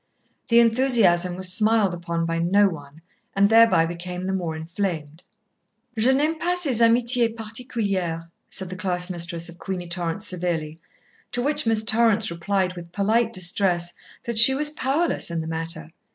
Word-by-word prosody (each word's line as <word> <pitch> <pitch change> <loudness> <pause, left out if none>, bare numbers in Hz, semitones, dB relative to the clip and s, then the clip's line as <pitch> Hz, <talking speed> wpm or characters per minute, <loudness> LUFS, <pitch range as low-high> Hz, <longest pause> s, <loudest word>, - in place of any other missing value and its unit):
The 235 0 +4
enthusiasm 225 -8 +3
was 185 0 +1
smiled 215 -2 +2
upon 170 -1 -3
by 165 0 -2
no 200 +5 +3
one, 150 -3 -9 0.3
and 200 0 +4
thereby 225 -7 +5
became 180 +2 -6
the 190 - -2
more 175 -4 -3
inflamed. 160 -2 -5 0.7
"Je 230 +4 +2
n'aime 305 +4 0
pas 355 +2 0
ces 260 -8 +1
amitiés 235 0 +3
particulières," 205 -7 -4 0.2
said 190 -1 -4
the - - -5
class 185 -1 -3
mistress 170 -1 -3
of 170 0 -13
Queenie 185 -2 -5
Torrance 175 +3 -3
severely, 165 -4 -4 0.5
to 245 - -1
which 290 -3 0
Miss 220 -1 +2
Torrance 220 -2 +2
replied 185 +2 -1
with 170 -1 -10
polite 220 +4 +1
distress 180 -3 0 0.3
that 235 -3 +1
she 265 +4 +9
was 295 +2 +2
powerless 300 - 0
in 170 -1 -3
the 160 - -4
matter. 165 0 -4
190 Hz, 160 wpm, -23 LUFS, 170-230 Hz, 0.7 s, she